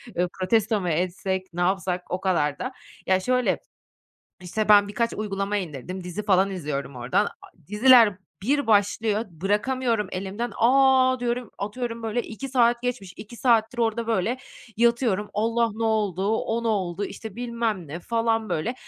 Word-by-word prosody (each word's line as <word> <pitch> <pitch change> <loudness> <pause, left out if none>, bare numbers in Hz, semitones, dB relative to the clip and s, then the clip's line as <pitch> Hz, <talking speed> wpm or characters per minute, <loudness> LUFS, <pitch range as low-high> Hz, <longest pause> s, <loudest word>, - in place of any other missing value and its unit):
eee, 180 +1 +1
protesto 210 +2 +1
mu 180 - -2
etsek, 185 +2 -2
ne 175 - -3
yapsak 180 -1 -1
o 180 - -2
kadar 150 -6 0
da 255 - -3 0.4
Ya 185 0 +4
şöyle 250 +5 +1 0.8
işte 210 +5 -3
ben 205 -1 +7
birkaç 230 +3 -1
uygulama 200 -1 -2
indirdim, 180 +1 -5
dizi 180 +4 -5
falan 195 -1 +3
izliyorum 140 -7 -4
oradan 125 +12 +1
a - - -11 0.2
diziler 225 -1 +6 0.3
bir 285 +6 +1
başlıyor, 210 +1 +2
bırakamıyorum 210 +5 0
elimden, 200 +5 -4
"A!" 260 +1 +4
diyorum, 245 -2 -2
atıyorum 230 +3 -4
böyle 225 +2 -1
"2 230 +5 -7
saat 240 -2 +3
geçmiş." 205 -7 -3
2 215 +3 -10
saattir 235 -1 +2
orada 230 0 0
böyle 230 +3 0 0.4
yatıyorum. 235 -3 +2
"Allah! 230 +2 +1
Ne 225 +1 -3
oldu, 205 -4 0
o 230 +1 -2
ne - - +1
oldu? 195 -3 -1
İşte 220 0 -8
bilmem 230 -7 -2
ne." 165 +5 -6
falan 225 +1 0
böyle 225 +11 -1
210 Hz, 155 wpm, -25 LUFS, 185-235 Hz, 0.8 s, ben